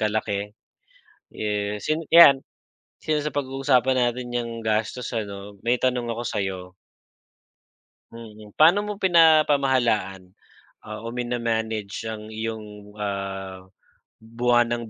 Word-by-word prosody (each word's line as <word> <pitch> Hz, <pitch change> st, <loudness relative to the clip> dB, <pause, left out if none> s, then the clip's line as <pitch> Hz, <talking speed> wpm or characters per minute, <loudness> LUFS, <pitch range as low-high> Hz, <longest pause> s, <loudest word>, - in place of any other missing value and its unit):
kalaki. 105 Hz, -1 st, -2 dB, 0.8 s
Eh, 105 Hz, -1 st, -3 dB
since 155 Hz, +7 st, -2 dB
yan, 140 Hz, -5 st, +8 dB, 0.6 s
since 150 Hz, -1 st, -1 dB
napag-uusapan 135 Hz, -2 st, +1 dB
natin 125 Hz, 0 st, 0 dB
niyang 120 Hz, -1 st, -3 dB
gastos 110 Hz, +3 st, -1 dB
ano, 100 Hz, -1 st, -6 dB
may 120 Hz, +1 st, +2 dB
tanong 125 Hz, -2 st, 0 dB
ako 115 Hz, +1 st, -4 dB
sa'yo. 95 Hz, -4 st, -2 dB, 1.6 s
Mm. 110 Hz, -2 st, -12 dB
Paano 175 Hz, +7 st, +4 dB
mo 210 Hz, -, -3 dB
pinapamahalaan 135 Hz, -, +3 dB, 0.8 s
o 115 Hz, -, -4 dB
mina-manage 115 Hz, -3 st, -3 dB
ang 110 Hz, -1 st, -7 dB
iyong, 105 Hz, -2 st, -7 dB
ah, 95 Hz, -2 st, -5 dB, 0.5 s
buwanang 120 Hz, 0 st, 0 dB
115 Hz, 95 wpm, -24 LUFS, 105-130 Hz, 1.6 s, yan